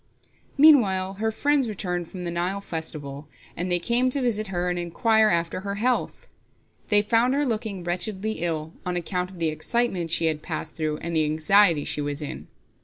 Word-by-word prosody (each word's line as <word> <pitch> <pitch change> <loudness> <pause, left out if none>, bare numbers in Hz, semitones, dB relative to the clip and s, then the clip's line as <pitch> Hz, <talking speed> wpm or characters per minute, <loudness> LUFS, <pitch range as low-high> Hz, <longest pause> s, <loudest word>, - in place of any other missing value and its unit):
Meanwhile 205 -11 +5
her 220 0 +1
friends 280 +1 +1
returned 180 -4 -3
from 180 0 -8
the 170 - -3
Nile 180 +3 -1
festival, 155 -5 -6 0.3
and 180 +1 -3
they 175 - +4
came 240 +8 +1
to 275 +2 0
visit 215 -4 0
her 180 -2 -2
and 175 0 -1
inquire 220 +6 +2
after 170 -1 0
her 200 +1 -4
health. 245 +5 -1 0.6
They 205 -1 +4
found 235 +4 +2
her 290 +1 +1
looking 215 -6 -3
wretchedly 190 +4 -2
ill, 160 -1 -3
on 180 0 -2
account 180 +1 -2
of 190 - -13
the 165 -2 0
excitement 190 +1 -1
she 165 0 +2
had 155 -1 0
passed - - -5
through 155 -1 -2
and 170 0 -3
the 155 -1 +3
anxiety 160 +1 +4
she 150 - -1
was 145 0 -3
in. 150 - -7
180 Hz, 185 wpm, -25 LUFS, 165-220 Hz, 0.6 s, Meanwhile